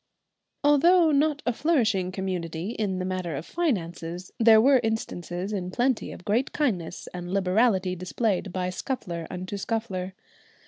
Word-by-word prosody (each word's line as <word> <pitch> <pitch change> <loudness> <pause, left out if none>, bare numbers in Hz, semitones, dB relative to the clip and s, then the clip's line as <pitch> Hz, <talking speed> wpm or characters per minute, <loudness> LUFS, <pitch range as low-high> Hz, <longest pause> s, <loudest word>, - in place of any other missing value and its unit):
Although 320 +4 +5
not 295 +1 +2
a 245 - +1
flourishing 225 - +1
community 185 -1 -3
in 205 -5 -2
the 185 - -2
matter 185 -4 -3
of 150 - -5
finances, 175 - -3
there 225 -1 +7
were 265 +3 +6
instances 195 -4 -3
in 185 -3 -3
plenty 245 +5 0
of 180 - -11
great 230 +6 0
kindness 195 - -1
and 175 0 -6
liberality 190 0 +2
displayed 190 +2 -1
by 180 0 -2
Scuffler 175 - -4
unto 185 +2 -5
Scuffler. 195 -4 -3
195 Hz, 140 wpm, -26 LUFS, 180-245 Hz, -, there